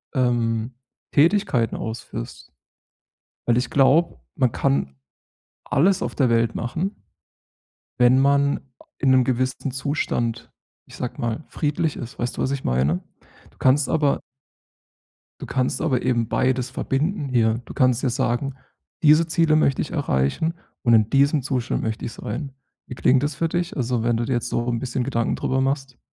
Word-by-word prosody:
ähm, 120 -2 0 0.4
Tätigkeiten 150 - +2
ausführst? 110 - -7 1.0
Weil 120 -1 +3
ich 125 -1 0
glaube, 140 +5 +3 0.2
man 130 -5 +2
kann 135 - 0 0.7
alles 185 +6 +2
auf - - -3
der 130 -4 +3
Welt 115 0 +2
machen, 170 - -3 1.0
wenn 125 +1 +5
man 140 +1 +3 0.2
a - - -17 0.2
in 135 - +3
‘nem 130 -1 +5
gewissen 130 +2 -1
Zustand, 130 -4 -2 0.4
ich - - -13
sage 125 - -5
mal, 120 +6 -2
friedlich 150 0 -1
ist, 120 -1 -8
weißt 120 0 -3
du, - - -2
was 130 - 0
ich 140 -1 -3
meine? 70 +8 +1 0.5
Du - - -28
kannst 135 +2 +3
aber 150 -3 +2 1.2
Du - - -6
kannst 130 -1 -1
aber 135 -6 +1
eben 120 -3 +1
beides 130 -1 0
verbinden 145 +5 -1
hier. 115 -2 +2
Du - - -10
kannst 125 -2 +2
ja 135 - +1
sagen: 130 +1 -1 0.5
„Diese 155 +1 +6
Ziele 160 -1 +3
möchte 140 -3 +2
ich - - -6
erreichen 145 - 0 0.3
und 120 -2 +4
in 110 -1 +4
diesem 140 +2 +3
Zustand 125 -3 -2
möchte 110 0 -3
ich 115 - -4
sein.“ 135 +8 -5 0.3
Wie - - -7
klingt 130 +1 +3
das 145 0 -1
für 165 +4 -1
dich? 175 +1 -2
Also, 125 -3 0
wenn 120 -1 +2
du 115 - -1
dir 130 - -1
jetzt 120 0 -1
so 120 - -1
'n 120 -1 0
bisschen 130 +1 -2
Gedanken 115 -3 0
drüber 130 - 0
machst. 135 -1 -2
130 Hz, 165 wpm, -23 LUFS, 120-145 Hz, 1.2 s, Diese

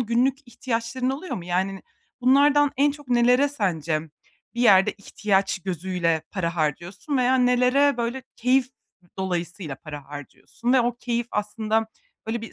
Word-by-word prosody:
günlük 245 +4 +1
ihtiyaçların 240 +1 -2
oluyor 295 +7 -4
mu? 175 - -7
Yani, 190 +2 -2 0.4
bunlardan 285 +3 +4
en 285 +2 +4
çok 290 -2 -11
nelere 250 +3 +4
sence 170 - -1 0.5
bir 240 - -3
yerde 195 -5 +5
ihtiyaç 200 -1 -1
gözüyle 175 -2 -1
para 170 -3 -3
harcıyorsun 170 - -2
veya 255 0 +3
nelere, 250 +3 +3
böyle, 240 +2 -3
keyif 255 +1 +2 0.5
dolayısıyla 175 -4 -3
para 150 -1 -9
harcıyorsun? 145 - -5
Ve 260 - +5
o 240 0 -1
keyif 240 -1 -2
aslında, 220 +1 -1 0.4
böyle, 225 +1 -2
bir 225 - -9
230 Hz, 140 wpm, -24 LUFS, 185-255 Hz, 0.5 s, yerde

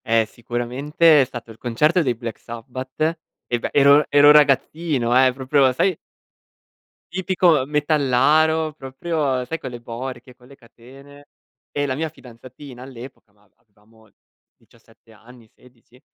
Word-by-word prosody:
Eh 115 -1 +2
sicuramente 130 +8 +1
è - - +2
stato 120 -3 -10
il 110 - -15
concerto 150 +9 +1
dei 125 -6 -1
Black 115 -1 -7
Sabbath 130 +7 -5 0.3
e 120 - -2
beh - - -4
ero 140 +1 +5
ero 145 +1 +6
ragazzino 145 -3 +2
eh, - - +1
proprio 130 +1 +1
sai 185 +8 +1 1.2
tipico 180 -6 +2
metallaro, 150 +2 +2
proprio 135 -1 -3
sai 145 +6 -5
con 130 - -7
le 120 -1 -10
borchie, 125 +2 -8
con 125 0 -22
le 140 - -16
catene. 135 +3 -17 0.4
E 145 0 -2
la 130 -2 -2
mia 160 +3 -2
fidanzatina 130 -1 -13
all'epoca, 130 -4 -13
ma 105 -1 -31
avevamo 110 0 -27 0.5
17 115 0 -25
anni, 115 +2 -18
16, 125 0 -24
130 Hz, 140 wpm, -21 LUFS, 120-150 Hz, 1.2 s, ero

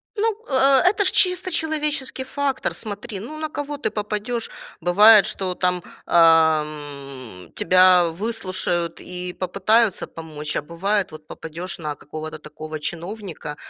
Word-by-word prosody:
Ну, 435 0 +1
э 270 0 +4
это 410 +2 +3
ж - - +4
чисто 365 0 +2
человеческий 300 -5 -1
фактор. 275 0 -2
Смотри, 210 0 -5
ну, 295 +10 -8
на 310 0 -3
кого 290 0 -5
ты - - -1
попадешь. 210 +2 -3 0.3
Бывает, 205 +4 +7
что 185 -2 -3
там, 180 -1 0 0.2
эм, 150 - +1
тебя 185 -1 +5
выслушают 185 -4 -2
и 180 0 -6
попытаются 200 +4 +1
помочь, 155 -2 -6
а - - 0
бывает, 190 +5 -1
вот, 155 0 -12
попадешь 170 +4 -6
на 150 -2 -4
какого-то 155 +2 -7
такого 155 +1 -8
чиновника, 175 -1 -6
185 Hz, 130 wpm, -22 LUFS, 160-235 Hz, 0.3 s, Бывает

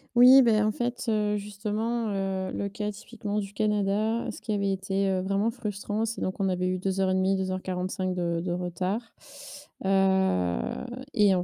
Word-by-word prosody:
Oui, 255 +2 +9
beh 220 -3 +4
en 210 - +3
fait, 240 +3 -3
heu, 210 -1 +1
justement, 215 +3 -2
heu, 195 -1 -2
le 200 - -2
cas 210 +1 -3
typiquement 210 0 -5
du 200 -1 -5
Canada. 210 +2 0
Ce - - -11
qui 220 - -4
avait 200 -1 +1
été, 195 +1 0
heu, 190 -1 +1
vraiment 195 +3 +1
frustrant, 210 0 -3
c'est 225 +1 -4
donc 185 - -1
qu'on 195 -1 0
avait 180 0 0
eu 185 0 0
2:30-2:45 185 0 0
de 170 -2 -1
de 175 +1 -3
retard, 180 +4 -2 0.8
heu, 190 - +2 0.6
et 205 -4 +5
en 180 - 0
195 Hz, 165 wpm, -27 LUFS, 185-215 Hz, 0.8 s, Oui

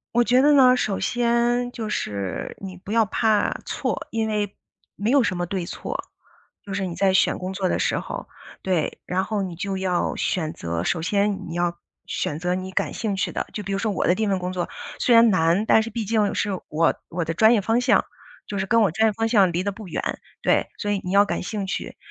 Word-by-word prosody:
我 240 - +5
觉 250 +2 +4
得 295 +1 +6
呢， 255 -2 +6
首 200 -5 -1
先 240 0 +1
就 220 -3 -5
是， 100 - -3
你 185 -2 -7
不 195 +3 -9
要 225 0 +4
怕 215 +1 +2
错， - - -2
因 225 -1 0
为 210 -2 -2 0.4
没 210 +3 -1
有 275 -2 +5
什 190 - 0
么 175 -1 -2
对 185 -2 -3
错。 - - -5 0.6
就 200 - -9
是 195 -1 -1
你 175 - -5
在 195 -1 +3
选 - - +3
工 185 +1 -4
作 190 -1 -1
的 - - 0
时 - - +1
候， - - -5 0.3
对。 180 -5 -1
然 185 +1 0
后 210 -1 -2
你 185 -3 -4
就 195 +3 -3
要 185 -2 0
选 160 -4 -1
择， 85 0 -3
首 160 - 0
先 200 0 0
你 165 - -5
要 175 0 -1 0.3
选 150 - -2
择 180 +1 -1
你 185 +1 -4
感 - - -1
兴 215 -3 -2
趣 190 - -1
的， - - -3
就 210 - -4
比 200 - -5
如 195 - -1
说 215 +1 0
我 195 - -1
的 175 - +4
第 215 - -3
1 215 - +1
份 195 -1 +1
工 180 0 -4
作， 180 -1 -2 0.3
虽 240 - +4
然 230 -1 +7
难， 175 +3 +2
但 220 - +5
是 225 - -4
毕 230 -1 -3
竟 210 -1 +1
是 205 - 0 0.2
我 165 +2 +2 0.2
我 170 0 -2
的 165 - -2
专 220 +6 +5
业 215 - +3
方 225 +4 +1
向， 250 +1 +3 0.4
就 200 -2 -4
是 190 - -1
跟 230 +3 +4
我 195 - +2
专 220 +7 +3
业 - - -3
方 225 +2 0
向 200 -6 +4
离 175 +2 -1
得 200 - -1
不 200 -1 -10
远， - - -3 0.2
对。 - - +3
所 205 - -2
以 200 -2 0
你 180 - -5
要 200 +1 +6
感 - - -2
兴 205 +1 -3
趣， 190 - -4
200 Hz, 260 characters per minute, -23 LUFS, 180-220 Hz, 0.6 s, 然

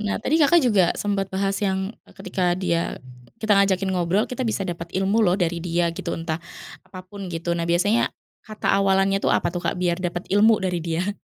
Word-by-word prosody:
eee, 210 - -5
nah 210 - 0
tadi 305 - 0
Kakak 335 +3 +5
juga 205 -7 +4
sempet 200 -2 -1
bahas 195 +1 -1
yang, 190 +1 -1
eee, - - -20
ketika 185 -2 -1
dia 170 -3 -1 0.4
kita 220 -2 +1
ngajakin 195 -1 +2
ngobrol 180 +4 +1
kita 255 +1 -4
bisa 200 -3 -1
dapat 170 -1 -5
ilmu 195 +4 +2
loh 180 -2 +3
dari 170 -2 -1
dia 170 -1 0
gitu 170 - -5
entah 165 0 -4 0.4
apapun 185 +1 -9
gitu 170 +1 -2
nah 170 - -2
biasanya, 205 +7 +2 0.3
kata 215 -1 -2
awalannya 195 0 +2
itu - - 0
apa, 175 - +1
tuh, 175 - -3
Kak, - - -2
biar 180 -1 0
dapet 175 0 -3
ilmu 215 +2 +5
dari 180 -2 -1
dia? 175 +5 -2
190 Hz, 200 wpm, -23 LUFS, 175-200 Hz, 0.4 s, Kakak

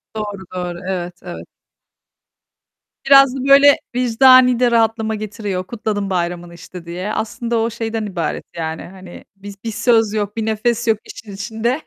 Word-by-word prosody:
Doğru, 205 -3 -5
doğru. 175 -1 -4
Evet, 180 -2 -4
evet. 175 -1 -9 1.6
Biraz 275 -1 +6
da - - -4
böyle, 280 +1 +7 0.2
vicdani 250 0 +5
de 245 -1 +3
rahatlama 225 -1 +1
getiriyor. 205 -3 -4
Kutladım 210 -4 -3
bayramını, 175 -1 -3
işte, 170 0 -11
diye. 180 +5 -5
Aslında 235 +1 -3
o, 225 +1 0
şeyden 225 -1 -4
ibaret, 175 -5 -3
yani. 160 -1 -4
Hani, 185 -1 -12
bi 200 +1 -10
bir 225 - -3
söz 225 -1 +2
yok, 205 0 -3
bir 220 - -1
nefes 230 +2 -1
yok 220 -1 +3
işin 210 -2 -11
içinde. 225 +7 -3
215 Hz, 150 wpm, -18 LUFS, 185-235 Hz, 1.6 s, böyle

